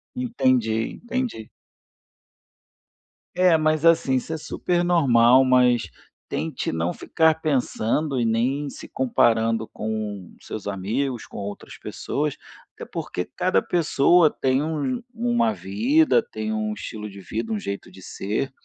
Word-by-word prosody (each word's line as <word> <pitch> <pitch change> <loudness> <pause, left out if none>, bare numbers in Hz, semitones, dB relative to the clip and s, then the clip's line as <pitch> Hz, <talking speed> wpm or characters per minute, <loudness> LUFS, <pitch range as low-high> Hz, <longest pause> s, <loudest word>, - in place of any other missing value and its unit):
Entendi, 130 - +1
entendi. 240 - -3 1.9
É, 180 -2 +5
mas 155 0 +1
assim, 165 -5 +4
isso 130 +5 -2
é 160 - -2
super 175 +3 -1
normal, 130 -7 +5
mas 125 -2 +4 0.4
tente - - -3
não 80 +2 -1
ficar 160 -1 +2
pensando 135 -1 0
e 120 - +1
nem 130 +6 0
se - - -10
comparando 115 -3 +1
com 105 -3 -5
os - - -19
seus 105 - -6
amigos, 110 +6 -2
com - - -11
outras 100 0 -7
pessoas, 150 -1 -3 0.4
até - - -9
porque 90 - -4
cada 185 +1 0
pessoa 170 0 +4
tem 130 0 +1
um 160 - -2
uma 235 -1 +1
vida, 290 - +2
tem 220 - -5
um 215 0 -1
estilo 105 - -7
de 100 0 -11
vida, 110 +3 -4
um 105 - -1
jeito 100 0 -6
de 95 +1 -14
ser. 105 +8 -3
130 Hz, 135 wpm, -24 LUFS, 110-175 Hz, 1.9 s, É